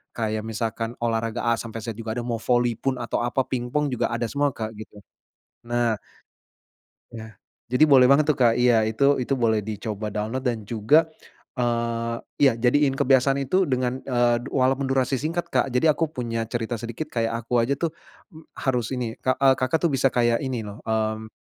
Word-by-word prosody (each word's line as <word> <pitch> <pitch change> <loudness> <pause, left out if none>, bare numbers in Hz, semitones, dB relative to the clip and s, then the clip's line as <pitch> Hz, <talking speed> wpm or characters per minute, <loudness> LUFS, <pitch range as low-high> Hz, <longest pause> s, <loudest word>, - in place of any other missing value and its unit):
kayak 110 -2 -2
misalkan 115 +1 -3
olahraga 115 0 -1
A 115 0 +2
sampe 115 -1 -6
Z 115 - -6
juga 110 -1 -4
ada, - - -1
mau 120 -1 -2
voli 120 0 +2
pun 135 -1 -1
atau 120 - -2
apa 120 +2 0
ping-pong 130 +4 -1
juga 125 - -1
ada 120 0 -1
semua, 145 +2 +1
Kak, 110 -2 -4
gitu, 110 -1 -11 0.7
Nah. 120 -1 +1 1.2
Ya. 110 -1 -9 0.3
Jadi 125 +5 +5
boleh 135 -3 +7
banget 145 +2 +5
tuh, 150 - +4
Kak, 120 -3 +4
iya 120 -2 +4
itu, 140 +6 +2
itu 135 - 0
boleh 110 -3 +2
dicoba 105 0 -4
download 110 +6 -3
dan 120 -4 -1
juga, 120 +9 +3 0.5
eee, 115 -1 -1 0.3
ya 135 -3 +6
jadiin 135 +4 +3
kebiasaan 135 +1 +3
itu 185 +8 +2
dengan, 130 -3 -1
eee, 120 -2 +2 0.2
walaupun 135 +1 +1
durasi 135 0 +1
singkat, 160 +6 -2
Kak. 125 +1 +2
Jadi 125 +5 +2
aku 165 +2 +1
punya 115 -5 -3
cerita 120 0 -2
sedikit 115 +6 -5
kayak 115 -1 -1
aku 120 0 +2
aja 130 +4 +1
tuh, 170 +1 -1 0.4
m 160 0 -13
harus 125 -4 -1
ini, 120 -3 -3
Kak, 130 - 0
eee, 135 -1 +6
Kakak 130 +5 0
tuh - - +1
bisa 135 0 +3
kayak 120 -1 +2
ini 130 -4 -3
loh, 105 +2 -9
mmm 110 0 -2
120 Hz, 185 wpm, -24 LUFS, 115-130 Hz, 1.2 s, boleh